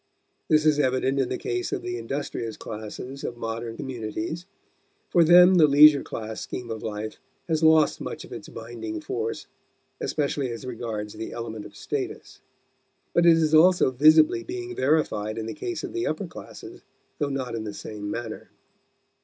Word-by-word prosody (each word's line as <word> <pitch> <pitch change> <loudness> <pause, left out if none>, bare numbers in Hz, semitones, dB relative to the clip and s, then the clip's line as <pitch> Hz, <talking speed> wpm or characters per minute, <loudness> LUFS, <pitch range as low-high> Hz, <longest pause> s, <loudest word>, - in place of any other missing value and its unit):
This 155 0 +3
is 150 -1 +4
evident 130 0 +1
in 130 -2 +1
the - - -2
case 370 -3 -3
of 390 -2 -3
the 365 0 -3
industrious 120 -5 -4
classes 110 +5 -7
of 120 - -4
modern 115 0 -5
communities; 130 - -5 0.6
for 170 - +5
them 180 +3 +8
the 155 -3 +7
leisure 145 0 +8
class 110 -1 -6
scheme 120 -2 -6
of 110 -1 -5
life 110 0 -5 0.3
has 160 -1 0
lost 160 -1 +4
much - - -6
of - - -11
its - - -8
binding 110 -2 -6
force, 115 +2 -4 0.5
especially 140 -2 -1
as 115 +2 -6
regards 110 -4 -5
the 110 +1 -6
element 110 -2 -6
of - - -19
status. - - -5 0.7
But 170 0 +4
it 165 -1 +7
is 160 -1 +1
also 175 -2 +6
visibly 155 - +5
being 365 +1 -6
verified 110 -8 0
in 110 - -3
the 115 - -4
case 360 -2 -5
of - - -6
the 355 0 -1
upper - - -2
classes, - - -11 0.4
though 145 -2 0
not 130 -3 -3
in 115 -1 -3
the 105 - -5
same 105 -1 -6
manner. 115 0 -6
130 Hz, 170 wpm, -25 LUFS, 110-160 Hz, 0.7 s, them